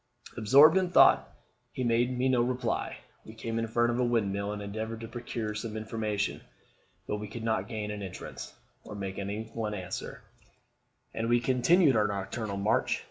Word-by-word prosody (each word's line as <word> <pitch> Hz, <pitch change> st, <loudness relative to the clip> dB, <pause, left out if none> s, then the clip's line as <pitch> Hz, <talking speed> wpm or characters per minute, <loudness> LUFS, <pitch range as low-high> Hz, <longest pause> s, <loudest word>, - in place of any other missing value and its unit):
Absorbed 140 Hz, -, +7 dB
in 185 Hz, -1 st, +1 dB
thought, -, -, +5 dB, 0.4 s
he 130 Hz, -, -3 dB
made 120 Hz, +1 st, +1 dB
me 130 Hz, +1 st, +1 dB
no 130 Hz, -2 st, +3 dB
reply. 125 Hz, -1 st, -1 dB, 0.3 s
We 110 Hz, -, -12 dB
came 115 Hz, 0 st, -3 dB
in 115 Hz, -, -1 dB
front 120 Hz, +1 st, +2 dB
of 120 Hz, -, -1 dB
a -, -, +3 dB
windmill, 100 Hz, -4 st, 0 dB
and 105 Hz, -, -4 dB
endeavoured 110 Hz, +2 st, -5 dB
to 115 Hz, -, -6 dB
procure 115 Hz, -2 st, -4 dB
some 110 Hz, +1 st, -5 dB
information; 110 Hz, -2 st, -2 dB, 0.7 s
but 105 Hz, -, -1 dB
we 105 Hz, 0 st, -6 dB
could 110 Hz, +2 st, -7 dB
not 110 Hz, -4 st, 0 dB
gain 110 Hz, -2 st, -4 dB
an 105 Hz, -1 st, -5 dB
entrance, 95 Hz, -2 st, -7 dB, 0.3 s
or 105 Hz, -, -9 dB
make 95 Hz, -1 st, -5 dB
any 100 Hz, +2 st, -3 dB
one 110 Hz, -2 st, -3 dB
answer, 90 Hz, -3 st, -6 dB, 0.9 s
and 115 Hz, +1 st, -2 dB
we 120 Hz, 0 st, +4 dB
continued 130 Hz, +5 st, +4 dB
our 105 Hz, -1 st, +3 dB
nocturnal 100 Hz, +1 st, -4 dB
march. 100 Hz, +2 st, +1 dB
110 Hz, 180 wpm, -29 LUFS, 105-120 Hz, 0.9 s, Absorbed